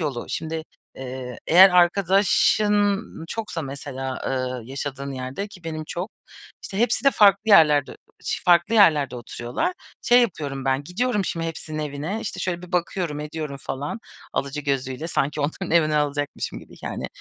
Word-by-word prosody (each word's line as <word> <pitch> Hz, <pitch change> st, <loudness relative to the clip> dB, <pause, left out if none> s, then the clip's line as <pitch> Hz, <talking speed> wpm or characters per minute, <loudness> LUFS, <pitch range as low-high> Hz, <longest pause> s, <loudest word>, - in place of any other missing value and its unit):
yolu, 140 Hz, -7 st, -3 dB
şimdi, 160 Hz, 0 st, -3 dB, 0.3 s
eee, 130 Hz, -1 st, -7 dB
eğer 185 Hz, +4 st, +8 dB
arkadaşın 200 Hz, +3 st, +3 dB, 0.3 s
çoksa 210 Hz, -7 st, -4 dB
mesela, 135 Hz, -1 st, -5 dB
eee, 130 Hz, -2 st, -3 dB
yaşadığın 140 Hz, 0 st, -5 dB
yerde 130 Hz, +10 st, -5 dB
ki 180 Hz, -4 st, -15 dB
benim 155 Hz, -1 st, -4 dB
çok, 175 Hz, +6 st, -5 dB, 0.5 s
işte, 195 Hz, -, -6 dB
hepsi 240 Hz, +3 st, +1 dB
de 275 Hz, -, +7 dB
farklı 200 Hz, -3 st, +5 dB
yerlerde 150 Hz, -7 st, +6 dB
ı -, -, -13 dB, 0.3 s
ş -, -, -2 dB
farklı 175 Hz, +5 st, +4 dB
yerlerde 150 Hz, -, +5 dB
oturuyorlar. 120 Hz, -, -3 dB, 0.3 s
Şey 245 Hz, +1 st, +6 dB
yapıyorum 140 Hz, -, -3 dB
ben, 135 Hz, +1 st, 0 dB
gidiyorum 210 Hz, -, 0 dB
şimdi 165 Hz, -1 st, -2 dB
hepsinin 155 Hz, -1 st, -6 dB
evine. 150 Hz, +7 st, -3 dB
İşte, 185 Hz, -3 st, -5 dB
şöyle 175 Hz, -1 st, -2 dB
bir 180 Hz, +1 st, -11 dB
bakıyorum, 170 Hz, -3 st, -1 dB
ediyorum 150 Hz, -2 st, -5 dB
falan 145 Hz, +10 st, -4 dB, 0.3 s
alıcı 140 Hz, +2 st, -2 dB
gözüyle. 135 Hz, +1 st, -2 dB
Sanki 150 Hz, -1 st, -1 dB
onların 160 Hz, +5 st, -3 dB
evini 155 Hz, -2 st, +3 dB
alacakmışım 145 Hz, -1 st, -2 dB
gibi -, -, -15 dB
yani. -, -, -4 dB
155 Hz, 155 wpm, -23 LUFS, 140-190 Hz, 0.5 s, eğer